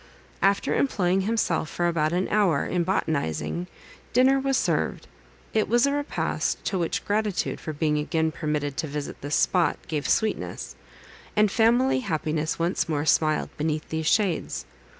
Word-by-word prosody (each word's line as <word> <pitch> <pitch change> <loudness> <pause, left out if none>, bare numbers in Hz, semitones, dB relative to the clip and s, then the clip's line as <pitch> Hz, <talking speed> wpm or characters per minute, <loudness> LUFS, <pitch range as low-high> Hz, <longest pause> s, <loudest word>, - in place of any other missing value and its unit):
After 195 +1 +2
employing 190 -8 +1
himself, 190 -7 0
for 175 - 0
about 155 -2 +1
an 180 +2 0
hour, 195 -9 +2
in 180 -1 0
botanizing, 160 - -1 0.5
dinner 265 +2 +5
was 270 0 +1
served. - - 0 0.5
It 215 -1 +2
was 240 +3 +4
a 280 - +1
repast, 290 0 -2
to 190 - 0
which 170 - -2
gratitude, 210 -1 -1
for 155 - -5
being 150 0 0
again 160 +1 0
permitted 150 -2 -2
to 160 - -1
visit 145 0 -5
this 145 +1 -1
spot, 175 -5 +2
gave 150 -2 -2
sweetness; 220 -1 -1 0.6
and 210 -1 +4
family 240 +5 +3
happiness 155 -7 -2
once 170 +1 0
more 150 -1 0
smiled 155 -1 +2
beneath 155 0 -2
these 160 -1 -2
shades. 170 - +1
170 Hz, 150 wpm, -25 LUFS, 155-210 Hz, 0.6 s, dinner